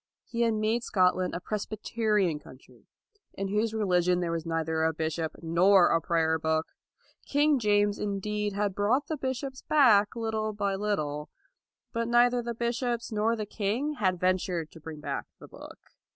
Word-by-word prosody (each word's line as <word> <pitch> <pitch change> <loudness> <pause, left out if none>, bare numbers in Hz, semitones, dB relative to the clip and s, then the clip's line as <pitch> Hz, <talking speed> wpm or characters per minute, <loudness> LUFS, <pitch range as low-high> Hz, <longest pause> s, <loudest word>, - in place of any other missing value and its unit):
He 235 - -3
had 230 -1 +2
made 215 +2 0
Scotland 185 -2 +1
a - - -2
Presbyterian 210 -3 -1
country, 130 -2 -17 0.5
in 195 0 -3
whose 210 +2 0
religion 180 -5 +2
there 175 -2 -1
was 165 0 -3
neither 160 -1 -1
a 160 0 +2
bishop 160 0 -2
nor 175 +3 +5
a 165 - +2
prayer 160 -1 +1
book. 160 0 0 0.6
King 290 0 +3
James, 205 -2 +2
indeed, 210 0 -2
had 200 0 -1
brought 220 +9 +1
the 315 - -3
bishops 265 -1 -4
back, 225 -9 +4
little 220 -2 -2
by 200 -1 -1
little; 155 -8 -2 0.6
but 230 0 -1
neither 240 +1 +4
the 235 0 -4
bishops 235 0 -2
nor 220 +2 +1
the 215 -2 -4
king 225 +9 -2
had 185 -3 +1
ventured 180 -3 0
to 165 - -13
bring 155 -1 -8
back - - -4
the - - -13
book. - - -12
205 Hz, 165 wpm, -28 LUFS, 175-230 Hz, 0.6 s, nor